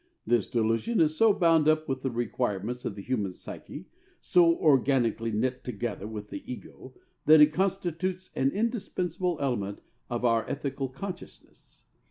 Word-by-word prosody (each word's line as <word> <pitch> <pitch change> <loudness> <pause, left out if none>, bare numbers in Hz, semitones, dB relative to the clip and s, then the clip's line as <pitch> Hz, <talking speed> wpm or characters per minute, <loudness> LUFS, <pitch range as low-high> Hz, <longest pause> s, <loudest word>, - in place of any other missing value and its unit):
This 115 -2 +1
delusion 115 - 0
is 155 -1 +3
so 225 +5 +5
bound 165 -5 +3
up 155 0 +3
with 130 -1 -2
the 135 - -1
requirements 120 -1 -2
of 100 - -3
the 100 - -8
human 105 -7 -2
psyche, - - -9 0.3
so 170 -2 +4
organically 130 -6 +2
knit 125 +4 -1
together 110 -3 -4
with 105 -1 -7
the - - -5
ego, 130 +1 -10 0.3
that 155 +1 +8
it 150 0 +7
constitutes 185 -1 -2
an 135 - +2
indispensable 185 - -2
element 105 -8 -2 0.3
of 120 0 -2
our 115 -1 +3
ethical 135 -1 -3
consciousness. 180 +8 -10
135 Hz, 150 wpm, -28 LUFS, 115-170 Hz, 0.3 s, that